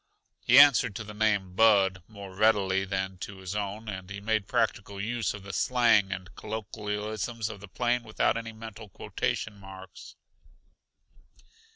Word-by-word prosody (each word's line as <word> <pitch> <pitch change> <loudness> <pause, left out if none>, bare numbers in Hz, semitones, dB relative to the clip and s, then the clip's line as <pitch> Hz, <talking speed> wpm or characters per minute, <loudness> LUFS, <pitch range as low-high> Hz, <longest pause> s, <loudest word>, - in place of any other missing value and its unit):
He 125 - +5
answered 140 -7 +7
to 110 - -5
the 105 0 -9
name 105 -4 0
"Bud" 95 -3 +4
more 100 -3 -10
readily 95 -2 +2
than 95 -1 -3
to 100 +1 -7
his 95 +1 -6
own, 105 +2 -4
and 95 -3 -6
he 100 0 -6
made 110 -1 -1
practical 105 -4 -1
use 115 +2 -2
of 100 - -10
the 100 0 -8
slang 115 -6 +3
and 95 -2 -6
colloquialisms 110 +1 -4
of 110 -2 -8
the 105 - -11
plains 120 +4 0
without 110 - +1
any 115 0 -5
mental 110 -1 -10
quotation 105 +2 -3
marks. 95 0 -12
105 Hz, 155 wpm, -28 LUFS, 95-110 Hz, -, answered